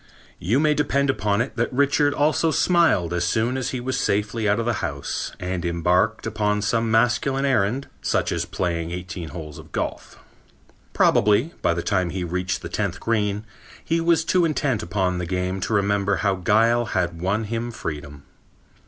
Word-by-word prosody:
You 110 +10 +1
may 155 0 +3
depend 140 -2 +1
upon 105 -2 0
it 130 - -4
that 120 - 0
Richard 140 +2 +2
also 155 +2 +2
smiled 160 - +3
as 85 0 0
soon 110 +8 +1
as 130 -1 -2
he 130 - -3
was 130 +2 -2
safely 105 +1 0
out 105 +2 +2
of 115 - -1
the 120 - +1
house - - -3
and 90 -1 -3
embarked 90 +6 +1
upon 105 -2 0
some 115 +1 +1
masculine 120 +4 +2
errand, 130 0 +1
such 70 - 0
as - - -1
playing 85 -2 -2
eighteen 85 -1 -6
holes 75 -4 -8
of - - -14
golf. - - -4 0.8
Probably, 105 +10 +3
by 85 - +2
the 85 - -3
time 95 -4 0
he 90 +1 -3
reached 90 +2 -2
the - - -4
tenth 100 -3 -2
green, 105 -2 -1 0.4
he 165 +1 +1
was 165 -1 +2
too 180 +1 +3
intent 145 -7 0
upon 90 +1 -1
his 85 -1 -4
game 90 +1 -1
to 95 - -2
remember 100 -1 +2
how 100 +2 +1
guile 115 +6 +2
had 85 -2 -1
won 100 +5 0
him 115 +2 -3
freedom. 75 -9 -6
105 Hz, 180 wpm, -23 LUFS, 90-125 Hz, 0.8 s, may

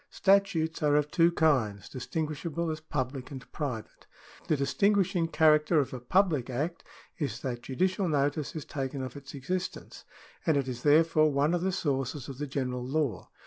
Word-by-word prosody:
— - - -46
Statutes 190 -5 +2
are 145 -1 +3
of 150 0 +1
two 170 0 +4
kinds, 130 - +1
distin 150 +5 -3
guishable 165 +2 -3
as 155 - -4
public 135 -4 -4
and 130 -3 -8
private. 125 -8 -5 0.4
The 155 - +2
distinguishing 180 +5 +2
charac 155 -2 +4
teristic 165 - +4
of 135 - -5
a 130 - -4
public 150 -1 +1
Act 150 +7 -3 0.4
is 145 -3 -3
that 120 -2 -4
judicial 185 +9 0
notice 145 0 0
is 155 -2 -5
taken 135 -3 -4
of 130 - -6
its 140 0 -9
existence, 180 +7 -4 0.4
and 160 -3 +2
it 135 -2 0
is 125 -1 -5
therefore 155 +1 +4
one 145 +4 +2
of 175 - +1
the 190 +1 +1
sources 135 -5 -2
of 135 -1 -8
the 145 - -3
general 125 -2 -2
law. 140 -1 -2
150 Hz, 185 wpm, -29 LUFS, 135-165 Hz, 0.4 s, two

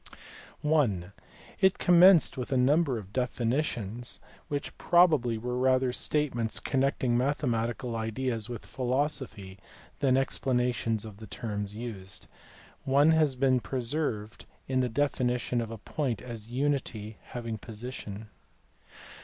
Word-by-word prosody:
(i) 110 - +2 0.5
It 190 0 +4
commenced 180 -1 +6
with 130 +1 -5
a 130 - +2
number 140 +1 +3
of 100 -2 -9
definitions, 120 -2 -1 0.3
which 145 0 -4
probably 155 -10 +4
were 125 +2 -3
rather 130 -1 +3
statements 125 -6 0
connecting 135 -3 +1
mathematical 120 -2 0
ideas 115 0 -2
with 120 -3 -6
philosophy 125 -7 -2 0.4
than 130 -2 +3
explanations 125 -4 0
of 105 -2 -9
the 110 0 -10
terms 105 -4 -4
used. 105 -5 -7 0.6
One 140 +4 +4
has 155 -4 +3
been 130 0 +3
preserved 120 -4 -3 0.2
in 130 -1 +1
the 125 -1 +1
definition 125 -2 0
of 115 - -4
a 115 - -6
point 125 +2 -2
as 115 -3 -7
unity 125 -5 -2
having 115 -3 -6
position. 110 -2 -7
125 Hz, 120 wpm, -29 LUFS, 110-135 Hz, 0.6 s, commenced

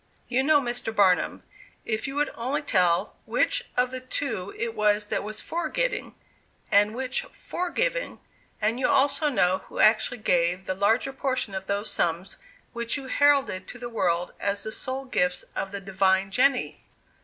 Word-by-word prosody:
"You 255 +1 +2
know, 295 +2 +5
Mr. 245 -3 -2
Barnum, 190 -4 +3 0.4
if 220 +1 -2
you 270 - -5
would 295 0 0
only 270 +6 -2
tell, 175 -9 +2
which - - +1
of 250 0 +2
the 260 - -4
two 255 -7 -3
it 230 -1 -2
was 210 -1 +2
that - - 0
was 215 +1 -4
'for 340 +1 -3
getting,' - - -2 0.6
and 205 +2 +4
which 260 - -1
'for 360 -7 -5
giving'; - - -1 0.4
and 220 +3 0
you 260 - +2
also 290 +3 +3
know 190 -7 +2
who - - -10
actually 220 +2 +4
gave 180 -3 +1
the 185 - -1
larger 220 +8 +1
portion 260 -6 -1
of 190 0 -5
those 200 +2 0
sums 175 +3 -1 0.4
which 235 +3 -1
you 270 -2 -8
heralded 275 -11 +3
to - - -9
the 240 0 -6
world 175 -6 0
as 200 0 -1
the 220 - -5
sole 260 +4 -4
gifts 180 -8 0
of 195 - -3
the 200 - -4
'divine 195 0 +1
Jenny. 255 +4 +2
225 Hz, 175 wpm, -26 LUFS, 195-265 Hz, 0.6 s, know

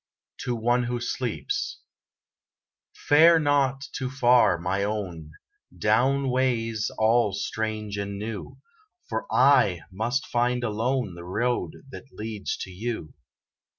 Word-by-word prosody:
TO 120 - -2
ONE 120 +2 +1
WHO 120 0 -2
SLEEPS 130 - -3 1.1
Fare 165 +2 +5
not 140 -2 +1
too 130 -1 -3
far, 125 -7 +4
my 90 +4 -1
own, 95 -7 -4 0.5
Down 130 +8 +2
ways 115 -4 0
all 110 -1 +3
strange 105 0 -3
and 100 0 -4
new, 105 0 -6 0.5
For 110 - -4
I 125 - +4
must 115 +7 -1
find 120 +1 0
alone, 115 -1 -1
The 85 0 -9
road 120 +7 -1 0.2
that 135 - -11
leads 105 -2 -4
to 95 - -9
you. 105 -4 -5
115 Hz, 120 wpm, -26 LUFS, 105-130 Hz, 1.1 s, Fare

